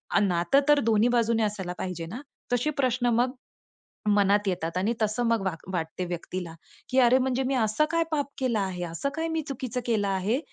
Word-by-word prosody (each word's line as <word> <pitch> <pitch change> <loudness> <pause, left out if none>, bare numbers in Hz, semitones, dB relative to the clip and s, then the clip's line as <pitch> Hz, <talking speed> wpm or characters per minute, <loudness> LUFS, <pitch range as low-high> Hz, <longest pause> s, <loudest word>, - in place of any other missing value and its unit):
अ, - - +6
नातं 180 +4 +3
तर 295 -1 +6
दोन्ही 225 +1 +4
बाजूने 230 -2 +2
असायला 195 -4 -2
पाहिजे 180 -3 -4
ना? 215 +11 -7 0.3
तसे 245 +5 +1
प्रश्न 250 -1 +1
मग, 245 +2 +2 0.8
मनात 205 0 +3
येतात 175 -2 -2
आणि 200 +6 +1
तसं 215 +3 +1
मग 230 -2 +2
वाग 170 -4 -2
वाटते 165 +1 -3
व्यक्तीला, 175 0 -5 0.4
की 260 +1 +3
अरे! 250 +1 +6
म्हणजे 260 0 0
मी 275 - 0
असं 225 +5 +2
काय 335 0 +2
पाप 290 -2 +1
केला 250 -5 +1
आहे, 185 -3 -2
असं 170 +11 -3
काय 325 +1 -1
मी 320 0 -1
चुकीचं 255 -2 -4
केलं 215 -4 +1
आहे, 195 +6 0
220 Hz, 195 wpm, -27 LUFS, 185-255 Hz, 0.8 s, अ